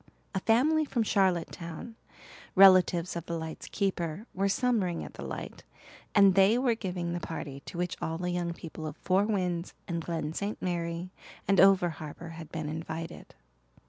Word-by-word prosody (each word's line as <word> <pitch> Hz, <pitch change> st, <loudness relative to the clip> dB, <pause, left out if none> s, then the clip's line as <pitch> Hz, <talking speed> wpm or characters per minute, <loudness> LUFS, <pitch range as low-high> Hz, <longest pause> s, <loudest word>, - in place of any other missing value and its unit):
A 190 Hz, -, 0 dB
family 280 Hz, +10 st, +3 dB
from 250 Hz, -6 st, 0 dB
Charlottetown, 180 Hz, +1 st, -1 dB, 0.6 s
relatives 185 Hz, -3 st, +6 dB
of 170 Hz, -1 st, -5 dB
the 170 Hz, -, -2 dB
light's 160 Hz, -1 st, -6 dB
keeper, 190 Hz, -1 st, -2 dB
were 195 Hz, +1 st, +1 dB
summering 200 Hz, -7 st, +1 dB
at -, -, -9 dB
the -, -, -9 dB
light, -, -, -6 dB, 0.5 s
and 200 Hz, -2 st, +7 dB
they 195 Hz, +4 st, +5 dB
were 250 Hz, -2 st, +2 dB
giving 180 Hz, -5 st, -3 dB
the 175 Hz, -, -2 dB
party 150 Hz, -5 st, -6 dB
to -, -, -7 dB
which 180 Hz, -1 st, -1 dB
all 160 Hz, 0 st, -2 dB
the 180 Hz, +1 st, -2 dB
young 175 Hz, -1 st, -1 dB
people 160 Hz, -1 st, -7 dB
of 150 Hz, -, -7 dB
Four 190 Hz, +2 st, +2 dB
Winds 180 Hz, -5 st, -1 dB
and 170 Hz, -2 st, -2 dB
Glen 160 Hz, -2 st, -3 dB
St. 200 Hz, +4 st, -3 dB
Mary 170 Hz, 0 st, -3 dB, 0.4 s
and 195 Hz, -, +4 dB
over 190 Hz, -2 st, +6 dB
harbour 155 Hz, +2 st, -8 dB
had 165 Hz, -1 st, -9 dB
been 155 Hz, -2 st, -4 dB
invited. 160 Hz, +1 st, -6 dB
175 Hz, 170 wpm, -29 LUFS, 165-195 Hz, 0.6 s, and